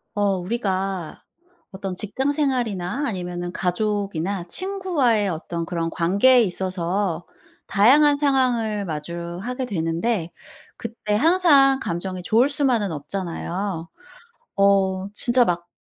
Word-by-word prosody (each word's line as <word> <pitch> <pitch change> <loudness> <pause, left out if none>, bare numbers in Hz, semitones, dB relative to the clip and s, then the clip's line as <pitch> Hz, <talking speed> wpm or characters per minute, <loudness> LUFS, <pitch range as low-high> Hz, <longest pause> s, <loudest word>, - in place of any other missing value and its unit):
어 200 -2 +1
우리가 190 -3 -3 0.5
어떤 190 -1 -5
직장생활이나 250 - -1
아니면은 175 -4 -4
가족이나 195 -1 -2
친구와의 315 - 0
어떤 170 0 -4
그런 165 -1 -2
관계에 200 +11 +4
있어서 185 -1 -2 0.4
다양한 280 +9 +5
상황을 250 -7 +1
마주하게 170 - -5
되는데 170 0 -1 0.5
그때 225 -3 -3
항상 285 - +5
감정이 185 -3 -4
좋을 235 +8 +3
수만은 255 - +1
없잖아요. 170 +2 -4 0.7
어 195 -1 +2
진짜 240 +4 +4
막 175 -2 -2
200 Hz, 255 characters per minute, -22 LUFS, 175-245 Hz, 0.7 s, 다양한